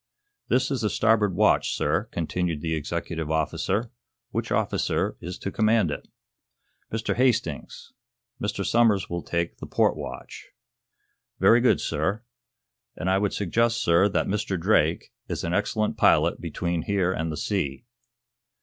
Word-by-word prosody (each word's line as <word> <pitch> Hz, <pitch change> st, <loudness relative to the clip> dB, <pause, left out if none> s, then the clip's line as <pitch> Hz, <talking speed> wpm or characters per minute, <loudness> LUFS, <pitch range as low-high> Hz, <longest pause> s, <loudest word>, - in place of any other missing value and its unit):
"This 130 Hz, +2 st, +1 dB
is 135 Hz, -, -1 dB
the 105 Hz, -, +1 dB
starboard 105 Hz, -5 st, +2 dB
watch, 105 Hz, +2 st, +3 dB
sir," -, -, 0 dB
continued 85 Hz, -1 st, -2 dB
the 80 Hz, 0 st, -2 dB
executive 80 Hz, +1 st, -3 dB
officer. 95 Hz, -, -1 dB, 0.4 s
"Which -, -, -3 dB
officer -, -, 0 dB
is 90 Hz, +2 st, -6 dB
to 100 Hz, -, -5 dB
command 110 Hz, -6 st, +2 dB
it?" -, -, -6 dB, 0.8 s
"Mr. 110 Hz, 0 st, -1 dB
Hastings. 115 Hz, -, -1 dB, 0.5 s
Mr. 105 Hz, -1 st, -2 dB
Somers 110 Hz, -7 st, +2 dB
will 85 Hz, 0 st, -2 dB
take 85 Hz, 0 st, -2 dB
the -, -, -7 dB
port -, -, +2 dB
watch." -, -, -8 dB, 0.9 s
"Very 120 Hz, +1 st, +6 dB
good, 125 Hz, -, +4 dB
sir. 95 Hz, +9 st, -1 dB, 0.7 s
And 95 Hz, -, -1 dB
I 95 Hz, -, +3 dB
would 100 Hz, 0 st, 0 dB
suggest, 115 Hz, +4 st, +1 dB
sir, 85 Hz, +2 st, +3 dB
that 100 Hz, -, 0 dB
Mr. 95 Hz, -2 st, -2 dB
Drake 80 Hz, -3 st, +1 dB
is -, -, -4 dB
an 85 Hz, -, -2 dB
excellent 105 Hz, +2 st, 0 dB
pilot -, -, +3 dB
between 85 Hz, -1 st, -2 dB
here 95 Hz, 0 st, 0 dB
and 80 Hz, -1 st, -2 dB
the 75 Hz, -, -5 dB
sea." 95 Hz, -, -2 dB
95 Hz, 145 wpm, -25 LUFS, 85-110 Hz, 0.9 s, Very